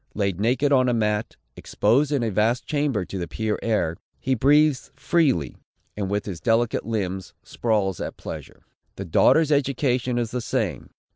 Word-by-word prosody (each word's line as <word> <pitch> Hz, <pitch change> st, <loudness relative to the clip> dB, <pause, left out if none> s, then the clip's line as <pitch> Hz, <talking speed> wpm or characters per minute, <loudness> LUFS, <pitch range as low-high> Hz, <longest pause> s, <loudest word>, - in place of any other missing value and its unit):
Laid 100 Hz, -3 st, -1 dB
naked 125 Hz, +6 st, +1 dB
on 130 Hz, -2 st, +4 dB
a 120 Hz, -, +1 dB
mat, 105 Hz, -1 st, -1 dB, 0.2 s
exposed 135 Hz, +8 st, +1 dB
in 140 Hz, -5 st, +1 dB
a 115 Hz, -, -1 dB
vast 110 Hz, +5 st, +1 dB
chamber 145 Hz, -, -1 dB
to 95 Hz, -, -6 dB
the 85 Hz, -, -3 dB
pure 110 Hz, +5 st, -2 dB
air, 85 Hz, -8 st, 0 dB, 0.2 s
he 135 Hz, -, 0 dB
breathes 145 Hz, +2 st, +3 dB
freely, 130 Hz, -, +1 dB, 0.4 s
and 100 Hz, -2 st, -3 dB
with 105 Hz, +1 st, -1 dB
his 95 Hz, -5 st, -6 dB
delicate 115 Hz, -1 st, +1 dB
limbs 95 Hz, -4 st, -3 dB
sprawls 105 Hz, -6 st, -1 dB
at -, -, -5 dB
pleasure. -, -, -9 dB, 0.3 s
The 95 Hz, -, -6 dB
daughter's 155 Hz, -, +4 dB
education 130 Hz, -3 st, +1 dB
is 120 Hz, -2 st, -1 dB
the 125 Hz, -, -2 dB
same. -, -, -2 dB
115 Hz, 165 wpm, -24 LUFS, 100-130 Hz, 0.4 s, on